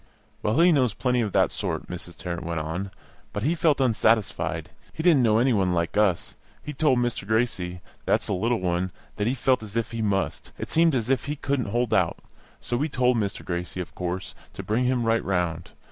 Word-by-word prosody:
"Well, 110 Hz, +8 st, +1 dB
he 175 Hz, +1 st, +7 dB
knows 130 Hz, -8 st, +2 dB
plenty 125 Hz, -1 st, +1 dB
of 105 Hz, -3 st, -1 dB
that -, -, +3 dB
sort," -, -, -3 dB
Mrs. 90 Hz, -1 st, -8 dB
Tarrant 85 Hz, -1 st, -4 dB
went 85 Hz, -1 st, -2 dB
on, 80 Hz, +6 st, -3 dB, 0.4 s
"but 105 Hz, +1 st, -3 dB
he 155 Hz, +6 st, +2 dB
felt 160 Hz, -4 st, +2 dB
unsatisfied; 115 Hz, -4 st, +1 dB, 0.2 s
he 160 Hz, -, -5 dB
didn't 165 Hz, -6 st, +5 dB
know 110 Hz, -2 st, +4 dB
any 125 Hz, +2 st, +3 dB
one 95 Hz, -4 st, +2 dB
like 85 Hz, -1 st, -1 dB
us. 105 Hz, -5 st, +2 dB, 0.3 s
He 150 Hz, -, -5 dB
told 140 Hz, -2 st, +3 dB
Mr. 120 Hz, -5 st, -1 dB
Gracie 105 Hz, -6 st, 0 dB, 0.2 s
(that's -, -, +1 dB
the -, -, -1 dB
little 115 Hz, +5 st, +1 dB
one) 90 Hz, 0 st, 0 dB, 0.3 s
that 105 Hz, -, 0 dB
he 125 Hz, -, +1 dB
felt 130 Hz, -1 st, +2 dB
as 110 Hz, 0 st, -6 dB
if 115 Hz, -, -1 dB
he 115 Hz, -1 st, -3 dB
must; 100 Hz, -2 st, -1 dB
it -, -, -6 dB
seemed 165 Hz, -2 st, +4 dB
as 120 Hz, 0 st, 0 dB
if 135 Hz, -, +1 dB
he 145 Hz, +1 st, -2 dB
couldn't 135 Hz, -6 st, -1 dB
hold 120 Hz, +1 st, 0 dB
out. -, -, +2 dB, 0.4 s
So 120 Hz, -, -2 dB
we 150 Hz, +5 st, 0 dB
told 125 Hz, -2 st, +2 dB
Mr. 100 Hz, -3 st, -2 dB
Gracie, 90 Hz, +1 st, -4 dB
of 90 Hz, -, -5 dB
course, 90 Hz, +1 st, -4 dB, 0.2 s
to 95 Hz, -, -7 dB
bring 110 Hz, +6 st, +1 dB
him 125 Hz, -1 st, +1 dB
right 115 Hz, 0 st, +2 dB
round. 90 Hz, -3 st, -1 dB
110 Hz, 215 wpm, -25 LUFS, 90-125 Hz, 0.4 s, he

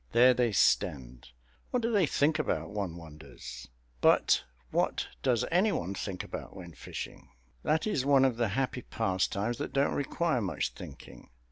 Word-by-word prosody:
There 125 Hz, +2 st, +7 dB
they 120 Hz, -1 st, +1 dB
stand. 65 Hz, -10 st, +1 dB, 0.4 s
What 250 Hz, -2 st, 0 dB
do 230 Hz, -, +1 dB
they 200 Hz, -7 st, +3 dB
think 155 Hz, +3 st, +2 dB
about, 155 Hz, -, -1 dB
one 100 Hz, -5 st, -3 dB
wonders? 75 Hz, -6 st, -10 dB, 0.3 s
But -, -, +4 dB, 0.3 s
what -, -, 0 dB
does 125 Hz, -4 st, +2 dB
any 190 Hz, +5 st, +4 dB
one 90 Hz, -, -2 dB
think 95 Hz, -1 st, -4 dB
about -, -, -7 dB
when 85 Hz, -2 st, -9 dB
fishing? 70 Hz, -, -8 dB, 0.3 s
That 155 Hz, 0 st, +1 dB
is 205 Hz, -12 st, 0 dB
one 135 Hz, -1 st, +5 dB
of 125 Hz, -3 st, +1 dB
the 120 Hz, -1 st, +2 dB
happy 125 Hz, +4 st, -1 dB
pastimes 100 Hz, +2 st, -1 dB
that -, -, -4 dB
don't 140 Hz, +1 st, +2 dB
require 145 Hz, -1 st, 0 dB
much 95 Hz, -, -1 dB
thinking. -, -, -11 dB
120 Hz, 160 wpm, -30 LUFS, 95-145 Hz, 0.4 s, There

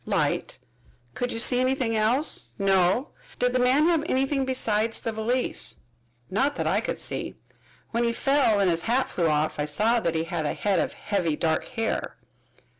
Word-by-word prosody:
"Light." -, -, 0 dB, 0.6 s
"Could 245 Hz, 0 st, -3 dB
you -, -, -3 dB
see 245 Hz, +2 st, +2 dB
anything 255 Hz, -3 st, 0 dB
else?" 220 Hz, -, +1 dB
"No." 195 Hz, +6 st, +2 dB, 0.3 s
"Did 250 Hz, 0 st, +1 dB
the 255 Hz, -, +2 dB
man 260 Hz, +5 st, +4 dB
have 335 Hz, -3 st, +3 dB
anything 270 Hz, +1 st, +1 dB
besides 225 Hz, -4 st, 0 dB
the 225 Hz, -, -3 dB
valise?" 230 Hz, +4 st, 0 dB, 0.6 s
"Not 275 Hz, +9 st, +1 dB
that -, -, -2 dB
I -, -, +1 dB
could -, -, -3 dB
see. -, -, -4 dB, 0.6 s
When 235 Hz, +1 st, 0 dB
he 235 Hz, -, +2 dB
fell 265 Hz, -4 st, +2 dB
and 195 Hz, -, +3 dB
his 165 Hz, -1 st, +1 dB
hat 255 Hz, +2 st, +2 dB
flew 170 Hz, -2 st, 0 dB
off 150 Hz, 0 st, 0 dB
I 145 Hz, -, 0 dB
saw 215 Hz, +11 st, +2 dB
that 170 Hz, -6 st, -1 dB
he 160 Hz, -, 0 dB
had 165 Hz, -2 st, -3 dB
a -, -, -2 dB
head 200 Hz, -2 st, +1 dB
of -, -, -1 dB
heavy 180 Hz, -7 st, -1 dB
dark 160 Hz, +1 st, 0 dB
hair." 225 Hz, -3 st, -3 dB
225 Hz, 185 wpm, -25 LUFS, 185-255 Hz, 0.6 s, man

